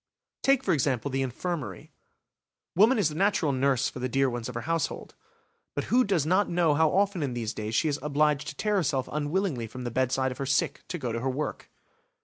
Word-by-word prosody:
Take, 270 -1 +3
for - - +2
example, 140 -2 0
the 135 +1 0
infirmary; 130 - -4 0.8
woman 220 +8 +5
is 195 -7 +2
the - - -7
natural 180 -3 +2
nurse 135 -1 +2
for - - -6
the 130 +1 -2
dear 135 +1 +2
ones 120 0 -4
of 125 - -8
her 120 - -2
household. 165 +5 -2 0.6
But - - -3
who 255 +1 +6
does 190 - +1
not 185 +5 +2
know 170 -3 +3
how 160 +1 +3
often 195 0 +1
in 135 -4 -2
these 115 -1 -3
days 110 +1 -4
she 160 - +2
is 145 -1 -1
obliged 150 0 +1
to 150 - -5
tear 210 +4 0
herself 140 -7 0
unwillingly 150 - -1
from 125 +3 -8
the 120 - -3
bedside 130 +2 +1
of 125 - -8
her 135 - -2
sick 135 - 0
to 180 - -4
go 125 -7 -3
to 115 - -2
her 130 +3 -1
work? 145 +4 -4
145 Hz, 220 wpm, -27 LUFS, 130-170 Hz, 0.8 s, who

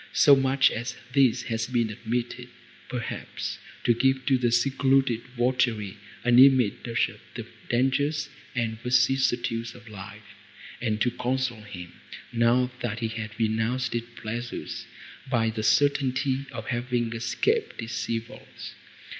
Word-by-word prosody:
So 145 - +7
much 135 0 +3
as 120 +1 -4 0.2
this 135 -4 +4
had 115 -1 -2
been 120 -3 +1
admitted, 120 +3 -3 0.4
perhaps, 120 -2 -4 0.2
to 120 - +4
give 130 +3 +1
to 135 - +4
the 120 -1 +2
secluded 135 -1 +2 0.2
votary 120 -5 +1 0.3
an 120 0 +5
image 130 -5 +5
of 115 -1 0 0.2
the - - -5 0.2
dangers 140 +5 +1 0.3
and 110 -2 -2
vicissitudes 120 -2 +1
of 120 -1 -14
life, 105 +1 -10 0.5
and 110 -3 0
to 125 - +3
console 125 -2 -2
him, 90 -4 -9 0.4
now 120 +2 +3
that 115 -2 -3
he 115 - 0
had 110 -1 -6
renounced 115 +2 0
its 120 0 -2
pleasures, 120 +2 -5 0.4
by 115 -3 +2
the 110 0 -4
certainty 135 +3 +2
of - - -6
having 120 -1 -1
escaped 430 - 0
its 115 0 -4
evils. 115 0 -6
120 Hz, 130 wpm, -26 LUFS, 115-130 Hz, 0.5 s, So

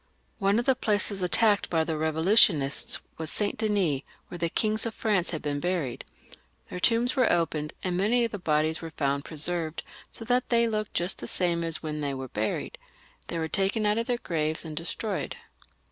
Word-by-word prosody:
One 200 +1 +3
of 240 - 0
the 265 - +5
places 205 -4 0
attacked 205 +3 +3
by 165 -2 +2
the 160 0 -2
Revolutionists 160 -2 +3 0.2
was 160 -1 -1
Saint 205 +3 0
Denis, 200 - +1 0.3
where 175 - -6
the 170 0 0
kings 215 +5 +1
of 225 - -6
France 205 -6 +1
had 160 - -4
been 145 -1 -2
buried. 170 -7 -2 0.7
Their 180 - -4
tombs 235 +7 +2
were 255 -4 +3
opened, 155 -3 0
and 180 -1 -1
many 230 +5 +3
of 230 - -4
the 205 - -5
bodies 155 -2 +1
were 165 - -6
found 140 -2 -1
presearved, 160 +1 0 0.3
so 225 - -6
that 245 +1 +1
they 235 -1 +4
looked 215 -2 -2
just 175 +2 -1
the - - -6
same 170 -2 +1
as 165 -1 -2
when 150 -1 -3
they 140 -2 -2
were 130 -1 -6
buried. 110 -1 -3 0.5
They 170 - -3
were 160 -1 -1
taken 195 +4 0
out 210 +2 +2
of 230 - -2
their 245 - +1
graves 155 -6 -1
and 155 -1 -6
destroyed. 185 +5 -3
175 Hz, 195 wpm, -27 LUFS, 155-215 Hz, 0.7 s, the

